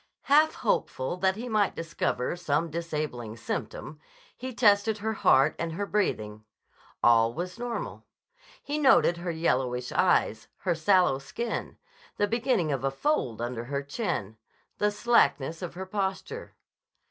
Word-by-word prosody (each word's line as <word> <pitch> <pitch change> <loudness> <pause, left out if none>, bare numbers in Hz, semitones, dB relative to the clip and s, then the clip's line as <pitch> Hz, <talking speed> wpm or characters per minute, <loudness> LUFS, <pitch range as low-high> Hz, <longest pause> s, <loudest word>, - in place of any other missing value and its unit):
Half 305 +3 +4
hopeful 130 - -1
that 190 +1 +2
he 235 +4 -6
might 215 -4 +1
discover 160 -5 -2
some 165 -1 -1
disabling 150 -9 -4
symptom, 150 +5 -5 0.4
he 255 +1 -6
tested 215 -2 +3
her 220 +1 -2
heart 135 -9 +4
and 165 -1 -2
her 205 +5 -2
breathing. 110 - -1 0.6
All 115 -1 +5
was 180 +5 -5
normal. 240 -1 -5 0.6
He 295 +2 -2
noted 260 - +5
her 175 +1 -4
yellowish 130 -7 0
eyes, 110 0 +2
her 180 - +1
sallow 175 -4 +3
skin, 225 - -4 0.4
the 205 - +3
beginning 230 - +1
of 135 -2 -2
a 135 - +2
fold 135 - -1
under 120 -1 -4
her 140 +2 -3
chin, 140 - -3 0.4
the 210 - +3
slackness 205 - +2
of 175 -2 -6
her 190 +1 -5
posture. 195 - -4
170 Hz, 140 wpm, -28 LUFS, 135-210 Hz, 0.6 s, All